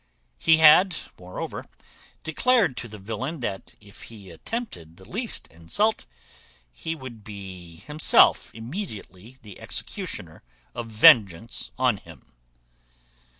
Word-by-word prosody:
He 160 0 +5
had 160 +3 +7 0.2
moreover 90 0 -7 0.6
declared 195 - +2
to 115 - -5
the 105 -1 -10
villain, 115 +10 -5
that 100 -5 -5
if 100 -1 -17
he 100 -5 -13
attempted 85 - -7
the 95 - -16
least 225 - -3
insult, 85 - -1 0.6
he 160 - -5
would 125 -7 -10
be 95 -5 -10
himself 150 - +4
immediately 115 - -8
the 105 -3 -12
executioner - - -5 0.3
of 120 -1 -6
vengeance 105 - +4
on - - +2
him. - - -16
115 Hz, 110 wpm, -25 LUFS, 95-160 Hz, 0.6 s, had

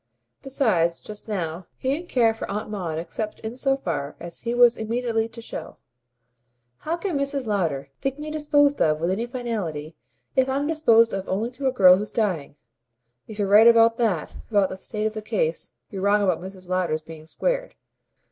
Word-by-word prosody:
Besides, 210 -12 +1
just 210 +1 -9
now, 175 -4 -3
he 260 - -1
didn't 345 +3 -8
care 230 -3 +3
for 225 - -7
Aunt 210 +1 -4
Maud 175 -6 -3
except 210 +6 -5
in 220 +2 -5
so 270 +1 +1
far 150 - -3
as 170 0 -7
he 235 +1 -2
was 240 -1 +6
immediately 225 0 -1
to 230 0 -10
show. - - -7 1.0
"How 330 +2 -2
can 345 -5 -2
Mrs. 280 -1 -2
Lowder 165 -10 -1
think 270 0 -2
me 305 +1 -6
disposed 290 -2 +2
of 155 -1 +3
with 170 +3 0
any 225 +5 -1
finality, 200 - -4 0.4
if 265 -1 +3
I'm 275 +2 0
disposed 235 -8 +4
of 195 -1 -4
only 220 +5 -1
to 270 +2 -3
a - - +3
girl 185 -6 +7
who's 210 +2 -4
dying? 185 -12 -1 0.7
If 215 - -9
you're 205 -2 0
right 210 +3 +7
about 230 0 +6
that, 205 -10 0 0.2
about 205 -4 +3
the - - -5
state 210 +2 -4
of 215 - 0
the 215 - -5
case, 475 - -2 0.2
you're 195 -2 -5
wrong 205 +1 +3
about 180 -4 +1
Mrs. 185 0 -10
Lowder's 175 -4 -1
being 155 0 -11
squared. - - -2
220 Hz, 190 wpm, -24 LUFS, 185-255 Hz, 1.0 s, girl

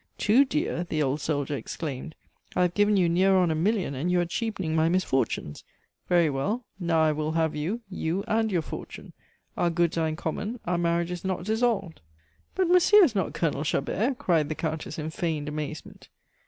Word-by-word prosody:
"Too 235 +7 +4
dear!" 170 - -1
the 155 -3 -1
old 140 +2 -1
soldier 145 -1 -1
exclaimed. 145 +1 -6 0.4
"I 180 - +3
have 175 -1 +1
given 205 +1 +3
you 180 -2 +3
near 185 +3 +3
on 180 -3 +3
a - - +2
million, 185 0 0
and 140 +7 -2
you 180 0 +3
are 175 - +1
cheapening 185 -3 -2
my 160 +1 +3
misfortunes. 135 - -1 0.5
Very 175 -2 +4
well; 195 - -2
now 165 -3 +2
I 155 - +4
will 155 +1 -2
have 160 -1 +1
you 175 +11 -2
you 185 0 -2
and 220 0 +1
your 175 -4 +1
fortune. - - -8 0.4
Our 175 - +1
goods 170 0 +1
are 160 - +1
in 155 - -2
common, 205 +9 -4
our 175 0 0
marriage 170 0 0
is 175 -1 -5
not 185 -2 -2
dissolved 215 -4 0 0.3
" 80 0 -39
"But 375 -1 +2
monsieur 365 +4 +6
is 285 -10 +3
not 190 -5 -1
Colonel 150 -3 0
Chabert!" 215 - 0
cried 170 - +1
the 155 - -2
Countess, 155 -2 -4
in 155 0 -4
feigned 160 -3 -2
amazement. 150 0 -6
170 Hz, 195 wpm, -27 LUFS, 155-195 Hz, 0.5 s, monsieur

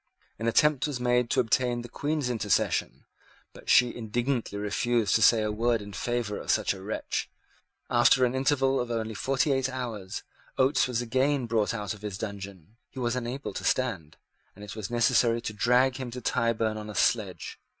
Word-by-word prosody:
An 115 - -2
attempt 150 +4 +3
was 140 -4 -4
made 125 -1 +1
to - - +1
obtain 120 +1 +1
the - - -8
Queen's 145 +1 -2
intercession; 105 -5 0 0.5
but - - -12
she 125 -1 +5
indignantly 120 0 -2
refused 110 +2 0
to 110 - +3
say 110 0 +5
a 105 - -1
word 115 +2 +1
in 105 -1 -9
favour 115 +2 -2
of - - -9
such - - +2
a 95 - -10
wretch. 105 +3 -3 0.6
After 125 +1 +4
an 125 - -1
interval 135 0 +2
of 120 - -2
only 110 -1 -2
forty 135 +6 0
eight 135 -1 +1
hours, 115 -7 -5 0.3
Oates 130 +1 +3
was 125 -1 -1
again 130 +2 +1
brought 115 -1 0
out 105 -4 -3
of 105 - -13
his 105 -3 -5
dungeon. 100 -2 -8
He - - -18
was 120 -1 0
unable 125 +3 -4
to - - -5
stand, 100 -13 -1 0.4
and 100 +1 -10
it 105 - -8
was 110 -3 -5
necessary 120 0 +3
to 110 - -5
drag 125 +4 +3
him 130 -2 -5
to 125 +2 -6
Tyburn 115 -2 0
on 105 0 -7
a 105 - -8
sledge. - - 0
120 Hz, 190 wpm, -27 LUFS, 105-125 Hz, 0.6 s, she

